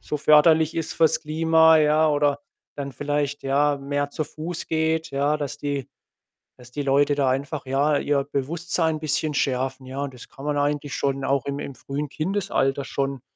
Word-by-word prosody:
so 150 - -4
förderlich 155 +2 +5
ist 165 - -3
fürs 160 -2 +3
Klima, 160 +1 +4
ja. 155 +1 +3
Oder 145 -1 +1 0.4
dann 140 -1 -5
vielleicht, 145 0 -2
ja, 145 +2 +2
mehr 145 +1 -2
zu 155 0 -3
Fuß 160 +3 -6
geht, 160 0 0
ja, 140 +2 +1
dass 145 -2 -5
die 140 -2 -3 0.7
dass 125 0 -14
die 145 - -4
Leute 140 +1 +3
da 135 -2 +2
einfach, 140 +2 -2
ja, 145 +2 +2
ihr 140 -1 +1
Bewusstsein 160 +3 -1
bisschen 155 0 -1
schärfen, 130 0 -1
ja, 135 +2 -5
und 135 -2 -5
das 125 - -12
kann 135 - -13
man 150 -1 0
eigentlich 145 0 -1
schon 135 -1 -1
auch 135 -1 0
im 140 0 -3
im 140 - -6
frühen 140 +2 -5
Kindesalter 155 -6 -1
schon 135 -2 -3
145 Hz, 180 wpm, -24 LUFS, 140-155 Hz, 0.7 s, förderlich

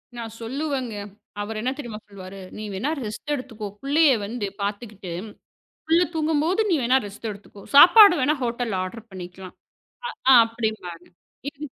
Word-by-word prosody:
நான் 230 -2 -7
சொல்லுவேங்க. 260 -1 -3 0.5
அவரு 215 +1 -4
என்ன 250 +3 0
தெரியுமா 235 -7 -7
சொல்லுவாரு. 195 -1 -10 0.2
"நீ 215 - -6
வேணா 220 +11 -1
ரெஸ்ட் 225 +7 -4
எடுத்துக்கோ. 235 -6 -5
புள்ளைய 290 +2 +4
வந்து 220 +1 -4 0.2
பாத்துகிட்டு, 205 -2 -5 0.8
புள்ள 335 +2 +4
தூங்கும்போது 320 +5 +1
நீ 350 - +3
வேணா 250 +2 +4
ரெஸ்ட் 205 +3 -7
எடுத்துக்கோ. 205 0 -13
சாப்பாடு 395 +6 +10
வேண்னா 290 +4 +2
ஹோட்டல்ல 235 -4 -2
ஆர்டர் 225 +5 -8
பண்ணிக்கலாம்." 185 0 -9 0.8
அ - - +9
அப்படின்ம்பாங்க. 220 -7 -4 0.5
இது 295 +1 -8
230 Hz, 135 wpm, -24 LUFS, 205-290 Hz, 0.8 s, சாப்பாடு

